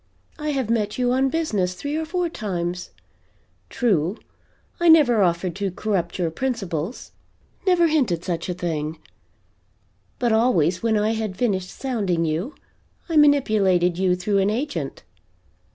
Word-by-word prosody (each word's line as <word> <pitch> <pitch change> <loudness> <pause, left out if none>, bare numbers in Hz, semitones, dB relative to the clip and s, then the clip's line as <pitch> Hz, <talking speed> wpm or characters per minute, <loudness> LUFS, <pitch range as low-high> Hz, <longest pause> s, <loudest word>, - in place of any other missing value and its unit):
I 300 0 -2
have 265 -6 -1
met 210 -3 0
you 250 -1 +1
on 265 +1 +2
business 210 - -1
three 285 +9 -4
or 320 0 -1
four 355 +2 -1
times; 180 - -4 0.8
true, 195 - +1 0.6
I 345 -1 +4
never 275 -9 +6
offered 175 -1 +1
to 200 -1 -1
corrupt 185 -2 -2
your 170 -3 -1
principles 195 - -3 0.6
never 355 -2 +5
hinted 255 - +1
such 170 -1 -3
a 180 - -2
thing; 160 -3 -3 1.2
but 240 -2 +1
always 220 -7 +2
when 225 -2 +2
I 210 +1 +1
had 220 -4 -3
finished 190 -6 0
sounding 200 -11 -1
you, 165 - -2 0.5
I 330 - -1
manipulated 205 - +3
you 185 -1 +2
through 195 +3 0
an 195 +1 +2
agent. 250 +8 -3
210 Hz, 140 wpm, -23 LUFS, 180-260 Hz, 1.2 s, never